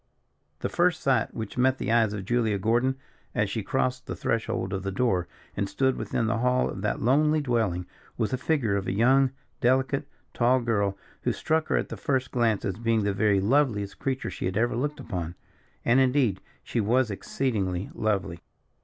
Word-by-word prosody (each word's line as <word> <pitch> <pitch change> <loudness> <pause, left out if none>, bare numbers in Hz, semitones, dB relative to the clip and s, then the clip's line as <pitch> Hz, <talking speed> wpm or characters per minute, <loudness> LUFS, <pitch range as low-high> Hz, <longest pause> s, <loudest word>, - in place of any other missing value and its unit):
The - - 0
first 175 0 +2
sight 130 -5 +2
which 110 +2 -5
met 130 +1 +3
the 110 - -2
eyes 115 -2 +4
of 100 -2 -5
Julia 115 -2 +1
Gordon, 120 +6 +1 0.4
as - - +1
she - - -2
crossed 130 0 -1
the - - -4
threshold 110 -4 -1
of 95 - -2
the 100 +1 -3
door, 95 -6 +1 0.3
and 100 -1 -1
stood 130 -1 +1
within 115 - -1
the 110 +1 0
hall 125 +1 +2
of 95 - -6
that 105 - -1
lonely 150 +5 +3
dwelling, 110 -10 0 0.3
was 110 - 0
the 130 - 0
figure 130 -9 +1
of 95 -1 -2
a - - 0
young, 130 +6 +4 0.3
delicate, 130 +2 +1 0.3
tall 125 +2 +3
girl, 100 -5 0 0.2
who - - +1
struck 160 0 0
her, - - +2
at - - -2
the - - -6
first 130 -2 -1
glance, 115 -4 +1
as 95 -1 -2
being 115 -2 +1
the 100 0 +1
very 100 -1 +3
loveliest 105 -2 +1
creature 130 -1 -2
she - - -5
had 95 +2 -1
ever 120 +1 +1
looked 145 +5 -2
upon. 85 -5 -4 0.5
And 125 +3 +5
indeed 130 -7 +2 0.2
she 115 - -1
was 120 +2 +2
exceedingly 100 -4 -2
lovely. 100 -5 -1
115 Hz, 190 wpm, -27 LUFS, 100-130 Hz, 0.5 s, And